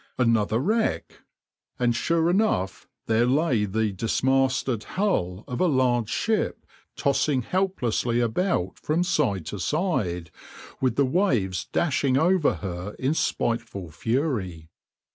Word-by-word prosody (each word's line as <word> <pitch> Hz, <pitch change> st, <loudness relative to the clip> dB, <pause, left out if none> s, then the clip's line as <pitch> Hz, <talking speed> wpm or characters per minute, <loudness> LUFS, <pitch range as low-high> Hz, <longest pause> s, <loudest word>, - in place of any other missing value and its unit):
Another 115 Hz, -3 st, +2 dB
wreck! 220 Hz, -, -1 dB, 0.6 s
And 120 Hz, -1 st, +1 dB
sure 165 Hz, +6 st, +1 dB
enough 175 Hz, -, 0 dB, 0.2 s
there 115 Hz, +2 st, +2 dB
lay 130 Hz, -5 st, +2 dB
the 105 Hz, +1 st, 0 dB
dismasted 130 Hz, +3 st, 0 dB
hull 105 Hz, -, -1 dB
of 125 Hz, -, -3 dB
a 185 Hz, -, +4 dB
large 125 Hz, -6 st, +2 dB
ship 220 Hz, -1 st, -1 dB, 0.3 s
tossing 140 Hz, -2 st, +1 dB
helplessly 125 Hz, -, 0 dB
about 120 Hz, -, 0 dB
from 160 Hz, +3 st, 0 dB
side 145 Hz, -, 0 dB
to 100 Hz, +5 st, -5 dB
side, 90 Hz, -, -1 dB, 0.5 s
with 130 Hz, -3 st, +1 dB
the 140 Hz, -, +3 dB
waves 125 Hz, -, 0 dB
dashing 135 Hz, -4 st, +1 dB
over 170 Hz, +1 st, +3 dB
her 90 Hz, +2 st, -5 dB
in 135 Hz, +3 st, 0 dB
spiteful 100 Hz, -, -2 dB
fury. 95 Hz, -, -2 dB
125 Hz, 120 wpm, -25 LUFS, 105-160 Hz, 0.6 s, a